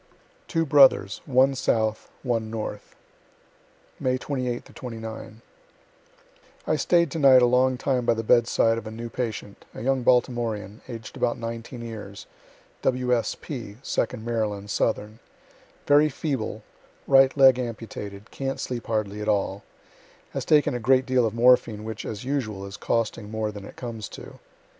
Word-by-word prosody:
TWO 165 -2 0
BROTHERS, 135 -9 +5
ONE 135 0 +4
SOUTH, 110 -4 0
ONE 115 -4 -1
NORTH 110 -1 -6 1.0
May 130 0 +1
28 125 -3 -4
9. 110 -2 -7 1.2
I - - +1
staid 170 -4 +2
to 165 - -3
night 130 -3 +7
a - - +7
long 125 +1 +3
time 125 -1 0
by 115 - +2
the 115 - -3
bedside 115 0 +3
of 110 - -10
a - - -4
new 115 +2 -6
patient, 110 -4 -5
a - - -7
young 135 0 +1
Baltimorean, 120 -4 +1
aged 115 -3 -8
about 120 - 0
19 115 +1 -6
years, 105 -3 -8 0.6
W. 125 -1 +1
S. 115 - -2
P., 120 -8 -7
(2d 115 -4 -2
Maryland, 105 -3 -2
southern,) 110 0 -1 0.7
very 145 +1 +5
feeble, 130 -7 -3 0.4
right 135 0 +5
leg 130 -2 +7
amputated, 110 -4 -6
can't 135 0 -3
sleep 125 -2 -4
hardly 105 -2 -2
at 105 - -2
all 100 -1 0 0.7
has - - -4
taken 150 -4 +4
a 120 - -2
great 130 +3 +3
deal 130 -3 +2
of 110 - -5
morphine, 115 -3 +4
which, 110 -1 -6
as 110 +2 -6
usual, 110 -8 -2
is 100 0 -8
costing 115 -2 -2
more 110 -1 -2
than 105 -1 -9
it - - -11
comes 115 -4 -6
to. - - -11
115 Hz, 150 wpm, -25 LUFS, 110-130 Hz, 1.2 s, night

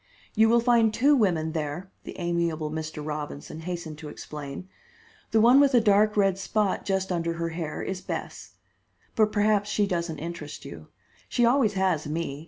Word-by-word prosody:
"You 220 0 +4
will 235 +1 +5
find 235 -2 +3
two 275 +7 +4
women 170 - +1
there," 160 +4 -4
the - - -8
amiable 170 -3 -1
Mr. 155 -1 -5
Robinson 150 0 -6
hastened 165 -2 -6
to 150 - -8
explain. 145 +3 -8 0.6
"The 225 - +3
one 240 +5 +7
with 280 -2 +4
a - - +7
dark 210 -1 +3
red 195 -2 +2
spot 200 0 -1
just 190 -1 -1
under 170 -1 -1
her 165 0 -3
hair 165 -2 -4
is 190 -1 -4
Bess. - - -6 0.6
But 215 -1 +3
perhaps 210 -1 +2
she 210 -1 +1
doesn't 170 -4 -2
interest 155 -1 -7
you. - - -10 0.4
She 240 - +2
always 235 -3 +3
has 185 -6 0
me. 150 -2 -3
180 Hz, 175 wpm, -26 LUFS, 160-215 Hz, 0.6 s, one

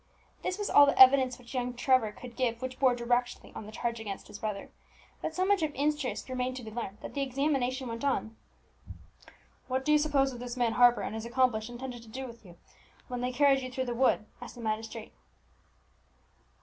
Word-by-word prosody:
This 370 - -2
was 415 -1 -2
all 285 - +7
the 280 - +1
evidence 260 -1 +7
which 245 0 -13
young 250 -1 -2
Trevor 245 -3 +3
could 240 +2 -11
give 235 -3 0
which 255 0 -6
bore 255 -3 +4
directly 245 +1 -1
on 210 - -8
the - - -9
charge 235 +1 -3
against 205 -3 -7
his 205 -1 -9
brother; 210 -2 -4 0.5
but 320 - -4
so 370 - +1
much 400 -1 +3
of 310 -1 0
interest 295 -1 -1
remained 255 0 -2
to 250 - -7
be 220 - -8
learned, 215 -3 -5
that - - -8
the 280 - -2
examination 265 -1 0
went 230 +1 -5
on. 255 -5 -1 1.3
"What 260 +1 -1
do 300 - +2
you 300 - +6
suppose 285 -3 +2
that 245 - -8
this 245 0 -6
man 235 -2 +1
Harper 245 0 +5
and - - -4
his 225 +1 -5
accomplice 240 -3 +1
intended 245 0 -7
to 230 - -15
do 265 +4 -6
with 235 -2 -11
you, 175 -3 -15 0.5
when 245 -1 -3
they 250 0 -1
carried 275 +1 +4
you 255 0 -6
through 260 +1 -2
the 240 - -2
wood?" 235 -3 +2 0.2
asked 245 - -9
the 240 - -9
magistrate. 220 0 -4
250 Hz, 215 wpm, -30 LUFS, 230-265 Hz, 1.3 s, all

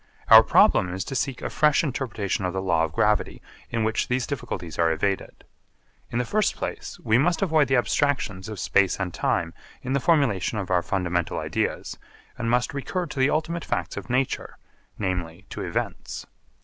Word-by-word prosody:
Our - - +11
problem 90 - +4
is 95 +1 -3
to 135 - -6
seek 130 0 -2
a - - -2
fresh 150 0 +3
interpretation 115 - -2
of 90 -1 -1
the 95 - -2
law 85 -3 +2
of 80 - -7
gravity 105 +6 +1 0.3
in 115 -1 -1
which 110 0 0
these 125 0 0
difficulties 90 - -5
are 85 -1 +4
evaded. 95 +4 -2 0.7
In 120 - -3
the 125 - 0
first 215 - +1
place - - -5
we 110 +2 +3
must 170 +5 +2
avoid 155 -5 +3
the 135 - +2
abstractions 120 -7 0
of 110 - -6
space 100 -1 +2
and 90 -3 -3
time 80 0 0 0.3
in 130 - -2
the 140 - +2
formulation 125 - +2
of 95 -3 -4
our 90 -1 +3
fundamental 90 -2 -1
ideas - - -2 0.4
and 115 - -3
must 125 +6 +1
recur 175 +6 -2
to 150 -4 -7
the 130 +2 +4
ultimate 160 +1 -1
facts - - -3
of - - -7
nature, 130 +1 -1 0.4
namely 90 -1 -3
to - - -5
events. - - -4
115 Hz, 185 wpm, -25 LUFS, 95-140 Hz, 0.7 s, Our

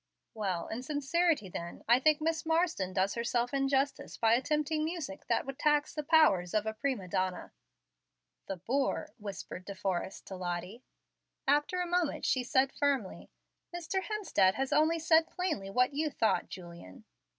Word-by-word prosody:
"Well, 190 -6 -2
in 225 +3 -4
sincerity 295 - +1
then, 170 -1 -7
I 240 +2 +6
think 305 +2 +4
Miss 320 0 0
Marsden 320 - +1
does 190 +1 +1
herself 240 +2 -1
injustice 275 0 0
by 225 0 +4
attempting 300 +4 +1
music 310 -3 -5
that - - +1
would 270 0 -7
tax 295 0 +2
the 300 - -2
powers 280 - +4
of 215 0 +2
a 220 - -2
prima 235 -4 -2
donna." 185 +1 -2 1.0
"The 195 - -4
boor!" 260 +9 -1
whispered 195 -3 -7
De 200 +1 -7
Forrest 190 0 -3
to 190 - -7
Lottie. 180 +5 -5 0.6
After 295 +6 +2
a - - 0
moment 350 -3 0
she 255 - +2
said 265 +1 +2
firmly, 275 -9 -1 0.5
"Mr. 350 +3 -2
Hemstead 380 - +1
has 270 0 -1
only 315 +2 +3
said 320 0 +4
plainly 320 - -2
what 250 +7 +2
you 305 +2 0
thought, 225 -5 0
Julian." 170 - -10
265 Hz, 160 wpm, -31 LUFS, 195-310 Hz, 1.0 s, I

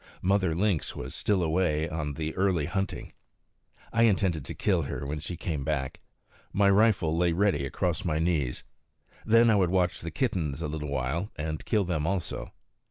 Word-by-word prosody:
Mother 95 -3 +2
Lynx 95 -3 0
was 65 +3 -6
still 95 +1 +1
away 80 -1 +1
on 80 -4 -3
the 80 +1 -3
early 95 -5 +1
hunting. 95 +4 -3 0.8
I 115 0 +5
intended 95 -8 +2
to - - -6
kill 95 -4 +1
her 70 -1 -4
when 75 +2 -3
she 85 +3 -6
came 75 -5 -3
back. 70 -3 -2 0.5
My 100 0 +4
rifle 100 -6 +3
lay 85 0 +2
ready 90 -7 +1
across 85 +4 -1
my 80 -4 0
knees. 80 -6 0 0.6
Then 115 +1 +6
I - - +4
would 95 -4 +3
watch 90 -1 +1
the 85 - -4
kittens 80 - -1
a 85 - -2
little 75 -1 -4
while, 70 +8 -2
and 75 +1 -4
kill 105 -2 +2
them 80 -4 -1
also. 95 -1 -3
85 Hz, 175 wpm, -28 LUFS, 75-95 Hz, 0.8 s, Then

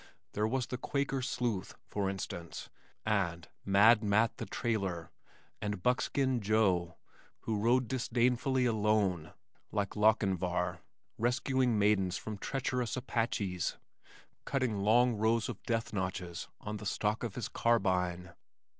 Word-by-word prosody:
There 105 +1 0
was 125 +2 0
the 125 - -5
Quaker 135 -1 -1
Sleuth, 120 -6 -2
for 100 -2 -1
instance, 85 -3 -6 0.3
and 85 -6 0 0.2
Mad 105 +3 +6
Matt 105 +2 +2
the - - -5
Trailer, 95 -8 -2 0.5
and 105 -3 -3
Buckskin 130 0 +1
Joe 95 -5 +2 0.5
who 110 -2 -1
rode 120 +3 +3
disdainfully 125 +1 +1
alone 105 -7 +1 0.4
(like 100 -2 -1
Lochinvar), 95 -5 +2 0.4
rescuing 125 0 +1
maidens 100 -3 +2
from 105 -2 -6
treacherous 125 -2 -2
Apaches, 110 -8 -1 0.7
cutting 130 -7 -1
long 115 +3 +4
rows 110 +1 +2
of - - -6
death 115 -1 -1
notches 90 -3 -3
on 105 0 -5
the 105 -1 -5
stock 105 +2 0
of 115 -5 -4
his 125 - -3
carbine. 90 -6 +1
110 Hz, 120 wpm, -32 LUFS, 95-120 Hz, 0.7 s, Mad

